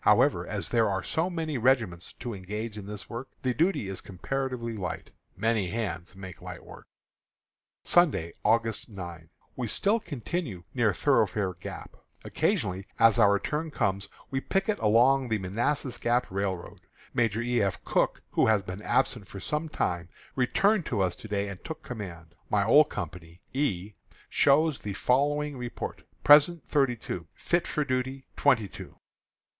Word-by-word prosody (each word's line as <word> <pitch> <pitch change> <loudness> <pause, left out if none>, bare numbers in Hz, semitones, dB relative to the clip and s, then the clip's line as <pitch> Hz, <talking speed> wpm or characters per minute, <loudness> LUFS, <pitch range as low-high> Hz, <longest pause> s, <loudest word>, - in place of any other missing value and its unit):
However, - - +4
as - - -3
there 115 -3 +3
are 95 -1 -1
so 165 +4 0
many 160 -6 -2
regiments 110 -8 +1
to 120 -2 -6
engage 105 +3 -5
in 100 -2 -8
this 105 0 -7
work, 120 +3 -6 0.2
the 130 -1 +1
duty 165 - +1
is 95 -1 -4
comparatively 120 +4 -3
light. 90 -5 -5 0.3
"Many 110 -2 +1
hands 95 -4 -4
make 95 -2 -9
light - - -8
work." - - -13 1.0
Sunday, 140 - +3
August 115 +1 +1
9. 85 -5 -8 0.3
We 125 -2 -2
still 205 - +2
continue 145 - -4
near - - +3
Thoroughfare 95 -3 +2
Gap. 90 0 -9 0.3
Occasionally, 95 +2 0
as 115 -2 +5
our 100 +1 +6
turn 150 +10 -2
comes, 100 -8 -1 0.2
we 135 -1 -1
picket 195 +6 0
along 125 +4 +4
the 110 - +2
Manassas 120 +6 -1
Gap 120 +1 +2
Railroad. 95 -2 -3 0.3
Major 115 -1 +1
E. 120 -1 +1
F. 95 -2 -1
Cooke, - - +1
who - - +3
has 110 -3 +3
been 90 +2 -6
absent 120 -3 +1
for 100 - -8
some 150 +8 -2
time, 85 - -2 0.3
returned 195 - +2
to 115 - -1
us 90 -2 +1
to - - -9
day 100 -1 -1
and 100 -2 -8
took 160 0 -7
command. 85 -8 -7 0.2
My 100 -1 +2
old 150 +6 +6
company, 85 -2 -7
E, 105 -8 -1 0.4
shows 150 +1 +4
the 105 - -5
following 145 +6 +1
report: 120 -1 -5 0.2
Present, 150 +3 +6
thirty 135 -4 +2
two; 90 -7 -6
fit 175 0 0
for 150 -2 -1
duty, 130 0 -2
twenty 125 -8 +3
two. - - -11
115 Hz, 160 wpm, -28 LUFS, 95-135 Hz, 1.0 s, our